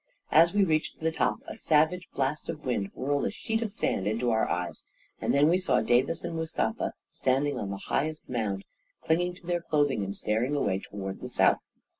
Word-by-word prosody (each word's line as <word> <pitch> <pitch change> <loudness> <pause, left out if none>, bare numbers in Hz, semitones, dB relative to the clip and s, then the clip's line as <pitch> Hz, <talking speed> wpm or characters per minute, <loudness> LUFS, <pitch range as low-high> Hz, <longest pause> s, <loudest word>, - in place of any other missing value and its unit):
As 165 +2 +6
we 205 0 +3
reached 155 -4 0
the 160 0 0
top, - - 0
a - - -7
savage 160 +4 +2
blast 140 +2 -1
of 155 -2 -5
wind 105 -6 -1
whirled 140 +2 0
a - - +1
sheet 225 +1 -2
of 220 -3 -2
sand 100 - -1
into 115 +3 +1
our 110 0 +2
eyes; 90 +2 -3 0.4
and - - 0
then 145 +2 +5
we 175 +3 +4
saw 185 - +2
Davis 125 +9 +2
and 165 - -4
Mustafa 160 0 -1 0.2
standing 135 +2 +1
on 100 - -3
the 100 0 -5
highest 155 +2 -1
mound, 105 -6 -2 0.4
clinging 175 +2 +1
to 180 - -17
their 175 0 0
clothing 145 -9 +1
and 100 +1 -4
staring 120 +7 0
away 100 -9 +1
toward 95 -1 -6
the - - -5
south. - - +3
145 Hz, 200 wpm, -28 LUFS, 110-165 Hz, 0.4 s, As